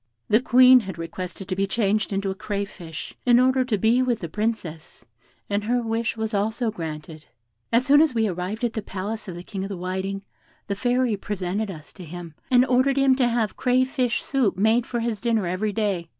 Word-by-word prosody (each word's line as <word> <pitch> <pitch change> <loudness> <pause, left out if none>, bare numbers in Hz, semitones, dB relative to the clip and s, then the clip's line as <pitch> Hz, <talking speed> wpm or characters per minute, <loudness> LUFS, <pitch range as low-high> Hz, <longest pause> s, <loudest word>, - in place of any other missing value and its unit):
The 215 +3 +4
Queen 255 0 +7
had 190 -6 -7
requested 180 +3 -6
to 185 - -2
be 195 +1 0
changed 210 0 0
into 195 0 -1
a - - -2
crayfish, 195 -5 -6
in 245 -1 +5
order 260 +1 +3
to 240 -4 0
be 225 +6 +3
with 250 -2 +1
the 170 - -6
Princess, 185 -6 -4 0.4
and 205 0 -1
her 245 +2 +1
wish 230 0 -2
was 220 0 -3
also 220 +3 0
granted. 155 -4 -7 0.4
"As 235 +2 +3
soon 290 +1 +6
as 310 -6 +2
we 220 -1 +2
arrived 185 +5 -4
at 235 -2 0
the 220 - -3
palace 205 +3 -5
of 180 - -6
the 175 - -8
King 190 0 -5
of 195 - -5
the 195 - -5
Whiting, 190 +2 -3 0.4
the 200 - -2
Fairy 245 +1 +1
presented 195 +1 -3
us 160 -5 -10
to 185 - -11
him, 170 0 -8 0.2
and 250 0 +5
ordered 260 +2 +2
him 270 -1 +4
to 250 -3 +3
have 230 -4 0
crayfish 255 -1 +1
soup 255 -9 +1
made 220 +4 +2
for 240 -2 -2
his 230 -3 -2
dinner 230 -4 +1
every 185 +5 -1
day. 200 -6 -1
215 Hz, 210 wpm, -24 LUFS, 190-240 Hz, 0.4 s, Queen